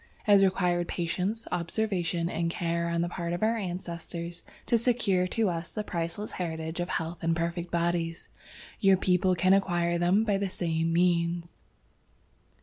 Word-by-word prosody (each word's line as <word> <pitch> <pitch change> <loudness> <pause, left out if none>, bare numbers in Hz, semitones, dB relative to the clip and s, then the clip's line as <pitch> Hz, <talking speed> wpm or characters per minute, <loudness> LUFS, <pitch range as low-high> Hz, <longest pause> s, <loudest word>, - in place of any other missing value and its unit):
"It 210 - +3
has 200 -1 +7
required 180 -2 +2
patience, 185 +6 -2
observation 175 -1 -1
and 170 -1 -1
care 170 0 -1
on 170 0 0
the 170 - 0
part 170 -1 -3
of 175 - -2
our 225 +1 +3
ancestors 175 -3 -5 0.2
to - - +2
secure 220 -6 +2
to 225 +3 +1
us 170 -2 -3
the 215 - -1
priceless 170 +2 -3
heritage 160 -1 -4
of 175 0 -2
health 165 0 -3
and 165 0 +2
perfect 170 +1 -2
bodies. 170 -1 -1 0.5
Your 195 -1 +5
people 185 0 +2
can 185 +2 +4
acquire 175 -3 +2
them 180 +5 +3
by 205 -3 +1
the 200 -1 -1
same 165 -2 -1
means." 170 0 +1
175 Hz, 160 wpm, -28 LUFS, 170-190 Hz, 0.5 s, has